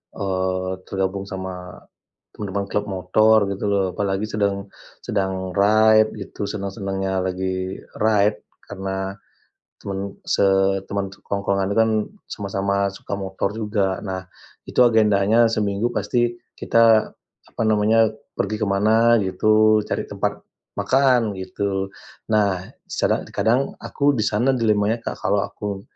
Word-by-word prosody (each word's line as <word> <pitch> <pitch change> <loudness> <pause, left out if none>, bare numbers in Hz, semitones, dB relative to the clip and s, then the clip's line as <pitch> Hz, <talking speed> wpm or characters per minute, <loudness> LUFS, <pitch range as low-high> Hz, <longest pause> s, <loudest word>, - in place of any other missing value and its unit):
eee, 95 -1 -1 0.2
tergabung 95 +1 -2
sama 95 -2 -7 0.5
teman-teman 100 -1 -4
klub 105 - 0
motor 110 +3 +3
gitu 100 +1 -4
loh, 100 -1 +2
apalagi 95 +2 -1
sedang 100 -2 -2 0.3
sedang 95 -2 -2
ride 110 +2 +5
gitu 100 +1 -5
senang-senangnya 95 -1 -3
lagi 95 0 -3 0.2
ride 105 -1 +3 0.3
karena 95 -1 -4 0.7
teman 100 0 -5
se - - +1 0.5
teman 100 -1 -1
tongkrongan 100 -1 -2
itu 100 - -2
kan 110 0 +4 0.4
sama-sama 100 0 -1
suka 100 - -6
motor 95 +1 -3
juga. 105 -4 -1
Nah, 95 -2 -4 0.4
itu - - -1
agendanya 110 -1 +4
seminggu 105 +3 0
pasti 120 +2 0 0.2
kita 115 -1 +4 0.4
apa - - -4
namanya, 110 +1 +4 0.3
pergi 105 +2 -1
ke - - +2
mana 110 +4 +4
gitu, 110 +3 +3
cari - - -2
tempat - - -2 0.4
makan 125 -6 +3
gitu. 95 +1 -3 0.4
Nah, 100 -4 +2 0.2
secara - - 0
kadang 120 +7 +1
aku 145 0 +1
di 110 - 0
sana 120 +6 +2
dilemanya, 110 -2 +1
Kak, - - -4
kalau 100 +1 +2
aku 100 -1 -5
100 Hz, 125 wpm, -22 LUFS, 95-110 Hz, 0.7 s, ride